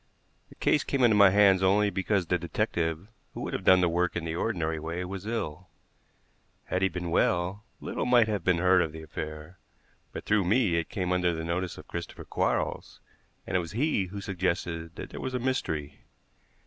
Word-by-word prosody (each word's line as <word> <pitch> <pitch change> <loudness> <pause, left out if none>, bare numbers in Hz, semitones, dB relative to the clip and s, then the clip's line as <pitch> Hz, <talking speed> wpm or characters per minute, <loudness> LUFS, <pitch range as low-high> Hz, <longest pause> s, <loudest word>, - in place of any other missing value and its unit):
The - - -16
case 150 - +2
came 135 -2 0
into 115 -3 +5
my 100 -2 +8
hands 95 -1 +5
only 100 +2 +3
because 95 0 0
the 90 +2 0
detective 80 +1 -2 0.3
who - - -5
would - - -4
have - - -3
done 95 -1 +6
the 90 - +3
work 85 +1 0
in 85 -2 -3
the 80 - -3
ordinary 85 -4 -1
way 85 +3 -4
was 95 +2 -6
ill. 95 -6 -4 1.0
Had 90 - -1
he 95 - +3
been 90 -1 -4
well, 90 +4 +1 0.2
little - - -3
might 120 -2 +5
have 105 -5 -2
been 90 -1 +3
heard 90 +1 +4
of 80 -3 -2
the 80 0 -8
affair; 75 +3 -7 0.5
but - - -7
through 105 -2 +3
me 105 -3 +2
it 85 - -2
came 95 -6 -2
under 90 -2 +1
the 80 - -4
notice 85 +2 -2
of - - -11
Christopher 85 0 -7
Quarles, - - -2 0.5
and 95 - -4
it - - +4
was 85 -1 -6
he 125 -4 +1
who 100 +2 -7
suggested 85 -3 -2
that - - -8
there - - -7
was 130 -1 -3
a - - 0
mystery. 80 - -2
90 Hz, 200 wpm, -28 LUFS, 85-100 Hz, 1.0 s, my